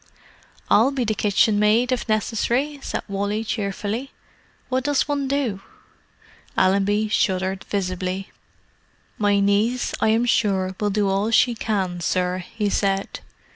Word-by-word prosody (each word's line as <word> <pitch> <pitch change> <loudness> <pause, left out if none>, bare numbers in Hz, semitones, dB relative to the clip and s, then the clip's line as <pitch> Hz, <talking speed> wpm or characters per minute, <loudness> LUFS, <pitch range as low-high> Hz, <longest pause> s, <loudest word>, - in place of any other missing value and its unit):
"I'll 230 +5 +5
be 275 -2 -1
the 220 -1 0
kitchenmaid, 210 +3 +2
if 250 -2 -2
necessary," 240 +7 0
said - - -4
Wally 205 +2 -2
cheerfully. 215 +4 -3 0.6
"What 260 0 -1
does 290 0 +1
one 285 -2 -1
do?" 265 -8 -1 1.0
Allenby 200 +3 +2
shuddered 190 -2 0
visibly. 185 -1 -3 0.9
"My 205 -1 +3
niece, 205 +5 +1
I - - +3
am 225 +2 +3
sure, 190 -5 +1
will 210 - +1
do 205 0 +1
all 195 +3 +1
she 235 +2 +4
can, 195 -6 -2
sir," 180 +1 0
he 210 +4 -3
said. 195 -1 -1
210 Hz, 130 wpm, -22 LUFS, 195-230 Hz, 1.0 s, I'll